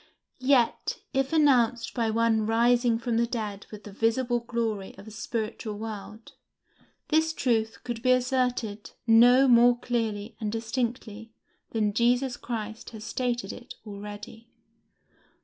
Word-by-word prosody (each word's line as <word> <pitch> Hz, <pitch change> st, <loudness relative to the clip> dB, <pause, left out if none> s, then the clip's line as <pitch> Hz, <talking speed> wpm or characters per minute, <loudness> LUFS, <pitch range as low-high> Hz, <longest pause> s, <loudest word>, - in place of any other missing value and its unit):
Yet, 255 Hz, -2 st, +2 dB, 0.2 s
if 270 Hz, 0 st, 0 dB
announced 245 Hz, -7 st, +3 dB
by 230 Hz, -2 st, 0 dB
one 220 Hz, -1 st, +2 dB
rising 235 Hz, +1 st, +3 dB
from 230 Hz, 0 st, -1 dB
the 235 Hz, 0 st, +2 dB
dead 210 Hz, -4 st, -5 dB
with 210 Hz, -1 st, -10 dB
the 205 Hz, -, -10 dB
visible 240 Hz, +4 st, +1 dB
glory 230 Hz, -4 st, -3 dB
of 195 Hz, +2 st, -12 dB
a -, -, -9 dB
spiritual 215 Hz, 0 st, -4 dB
world, 215 Hz, 0 st, -8 dB, 0.8 s
this 320 Hz, +1 st, +2 dB
truth 225 Hz, -6 st, 0 dB
could 240 Hz, -2 st, -5 dB
be 255 Hz, -, +1 dB
asserted 250 Hz, -4 st, 0 dB
no 245 Hz, +4 st, +6 dB
more 240 Hz, 0 st, +6 dB
clearly 225 Hz, -3 st, -3 dB
and 215 Hz, -2 st, -2 dB
distinctly 225 Hz, -1 st, -4 dB, 0.4 s
than 210 Hz, -2 st, 0 dB
Jesus 245 Hz, +3 st, +2 dB
Christ 225 Hz, -1 st, -6 dB
has 220 Hz, -2 st, -10 dB
stated 240 Hz, -5 st, -2 dB
it 245 Hz, -, -11 dB
already. 210 Hz, +2 st, -9 dB
230 Hz, 130 wpm, -27 LUFS, 220-245 Hz, 0.8 s, no